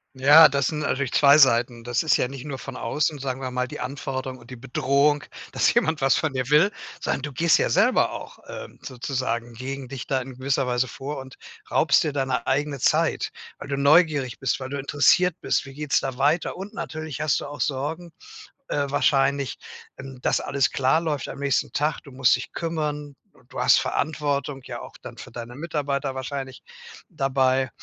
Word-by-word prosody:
Ja, 145 Hz, +5 st, +8 dB
das 140 Hz, -1 st, 0 dB
sind 155 Hz, -, -2 dB
natürlich 140 Hz, -3 st, -1 dB
2 140 Hz, +1 st, +6 dB
Seiten. 120 Hz, -3 st, +4 dB
Das 120 Hz, +4 st, 0 dB
ist 160 Hz, -, +3 dB
ja -, -, 0 dB
nicht 135 Hz, 0 st, -9 dB
nur 140 Hz, -3 st, -5 dB
von 135 Hz, -1 st, -8 dB
außen, 150 Hz, +5 st, -1 dB
sagen 135 Hz, -1 st, -4 dB
wir 130 Hz, -, -3 dB
mal, 125 Hz, 0 st, -2 dB
die -, -, -8 dB
Anforderung 130 Hz, 0 st, -4 dB
und 120 Hz, 0 st, -16 dB
die -, -, -6 dB
Bedrohung, 140 Hz, +4 st, +1 dB, 0.3 s
dass -, -, +3 dB
jemand 160 Hz, -2 st, +1 dB
was 135 Hz, 0 st, +4 dB
von 155 Hz, -3 st, -1 dB
dir 130 Hz, -2 st, -2 dB
will, 165 Hz, +7 st, +5 dB, 0.3 s
sondern 135 Hz, -, -2 dB
du 145 Hz, -1 st, -5 dB
gehst 165 Hz, +5 st, +4 dB
ja -, -, +1 dB
selber -, -, +3 dB
auch, -, -, -8 dB
ähm, -, -, -9 dB
sozusagen 120 Hz, -2 st, -3 dB
gegen 135 Hz, +2 st, -6 dB
dich 135 Hz, -1 st, -7 dB
da 135 Hz, -2 st, 0 dB
in 130 Hz, 0 st, -9 dB
gewisser 135 Hz, 0 st, 0 dB
Weise 125 Hz, +1 st, +1 dB
vor 140 Hz, +5 st, -6 dB
und 130 Hz, -1 st, -11 dB, 0.3 s
raubst -, -, +4 dB
dir 150 Hz, -, -2 dB
deine 130 Hz, -4 st, -1 dB
eigene 140 Hz, +1 st, -1 dB
Zeit. -, -, +1 dB, 0.3 s
Weil -, -, -9 dB
du 140 Hz, -, -1 dB
neugierig 145 Hz, -2 st, +3 dB
bist, 135 Hz, -1 st, -1 dB
weil 130 Hz, -1 st, -6 dB
du 140 Hz, -, -4 dB
interessiert 145 Hz, +5 st, +3 dB
bist, -, -, 0 dB
wie 135 Hz, -, -11 dB
geht's 150 Hz, 0 st, 0 dB
da 135 Hz, -2 st, -4 dB
weiter? 145 Hz, +6 st, +1 dB
Und 200 Hz, +4 st, -8 dB
natürlich 155 Hz, -3 st, -5 dB
hast 155 Hz, -3 st, +1 dB
du -, -, -7 dB
auch 145 Hz, 0 st, -9 dB
Sorgen, 150 Hz, +6 st, -2 dB, 0.6 s
äh, 145 Hz, -, 0 dB
wahrscheinlich, 140 Hz, -1 st, +1 dB, 0.4 s
ähm, 135 Hz, -2 st, -9 dB
dass -, -, +1 dB
alles 140 Hz, -2 st, 0 dB
klar 135 Hz, +4 st, +2 dB
läuft 155 Hz, -4 st, -3 dB
am -, -, -8 dB
nächsten 140 Hz, -2 st, 0 dB
Tag. 150 Hz, +2 st, -1 dB
Du 140 Hz, -, -14 dB
musst 130 Hz, -1 st, +3 dB
dich 125 Hz, -, -7 dB
kümmern 150 Hz, -3 st, -3 dB, 0.2 s
und -, -, -23 dB
du -, -, -3 dB
hast -, -, +5 dB
Verantwortung, 145 Hz, -2 st, -2 dB
ja, -, -, -6 dB
auch -, -, -11 dB
dann -, -, -9 dB
für -, -, -10 dB
deine 120 Hz, 0 st, -8 dB
Mitarbeiter 140 Hz, -3 st, -2 dB
wahrscheinlich 130 Hz, 0 st, -6 dB, 0.4 s
dabei. 135 Hz, -, +1 dB
140 Hz, 200 wpm, -24 LUFS, 130-150 Hz, 0.6 s, Ja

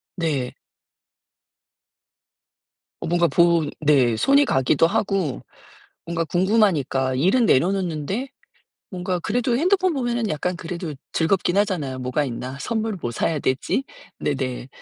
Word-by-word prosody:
네. 145 Hz, -8 st, -2 dB, 2.5 s
뭔가 175 Hz, 0 st, +2 dB
본 170 Hz, -3 st, +3 dB
네. 140 Hz, -6 st, +3 dB
손이 280 Hz, -, +4 dB
가기도 135 Hz, +4 st, +3 dB
하고 190 Hz, -6 st, -1 dB, 0.6 s
뭔가 165 Hz, 0 st, -1 dB
궁금하니까 170 Hz, -, +1 dB
일은 190 Hz, -, +3 dB
내려놓는데 185 Hz, -, 0 dB, 0.6 s
뭔가 180 Hz, 0 st, -2 dB
그래도 235 Hz, +6 st, 0 dB
핸드폰 370 Hz, +3 st, +2 dB
보면은 240 Hz, -5 st, -1 dB
약간 175 Hz, +4 st, -2 dB
그래도 170 Hz, -1 st, -5 dB, 0.2 s
즐겁긴 175 Hz, +2 st, +1 dB
하잖아요. 160 Hz, -11 st, 0 dB
'뭐가 130 Hz, +4 st, -1 dB
있나? 130 Hz, +1 st, -5 dB
선물을 220 Hz, 0 st, -2 dB
뭐 120 Hz, -, -3 dB
사야 150 Hz, +6 st, -1 dB
되지?' 130 Hz, -, 0 dB, 0.4 s
네네. 130 Hz, -3 st, -2 dB
170 Hz, 255 characters per minute, -23 LUFS, 140-205 Hz, 2.5 s, 손이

